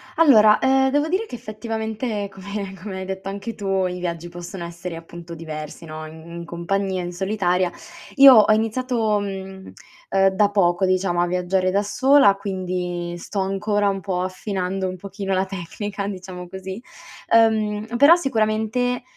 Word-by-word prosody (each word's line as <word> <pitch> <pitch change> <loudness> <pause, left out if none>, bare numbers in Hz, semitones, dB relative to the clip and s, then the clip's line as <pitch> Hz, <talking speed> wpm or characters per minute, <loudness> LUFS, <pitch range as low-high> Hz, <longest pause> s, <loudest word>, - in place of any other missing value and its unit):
Allora, 215 -10 +6
ehm, 265 0 +3
devo 290 +3 +1
dire 380 +6 0
che 335 - -8
effettivamente 220 -1 -4
come 200 0 -6
come 190 -2 -6
hai 190 - -5
detto 190 0 -5
anche 200 +3 -5
tu 195 -2 0
i 180 0 -5
viaggi 170 -1 -4
possono 175 +1 -8
essere, 170 0 -7
appunto, 170 +1 -10
diversi 155 0 -7
no: 155 0 -7
in 160 +1 -12
in 170 - -7
compagnia, 185 +2 -2
in 175 - -5
solitaria. 185 -1 0 0.4
Io 275 -1 +10
ho 215 -2 +6
iniziato, 225 -1 0
mhmm, 190 -1 -7 0.4
ehm, 195 0 +4
da 205 +1 +3
poco 190 -2 +2
diciamo 185 -1 +1
a 175 - +1
viaggiare 180 +1 0
da 200 +2 +1
sola, 260 -1 +4
quindi 180 -3 -4
sto 195 +3 -5
ancora 200 +2 0
un 195 0 -2
po' 180 -2 -2
affinando 185 0 -3
un 185 - -4
pochino 195 +1 -4
la 190 +1 +1
tecnica, 195 +2 -5
diciamo 185 -2 -7
così; 190 +3 -7 0.5
ehm, 220 0 +2
però 285 +6 +8
sicuramente, 245 -3 0
195 Hz, 160 wpm, -22 LUFS, 180-215 Hz, 0.5 s, Io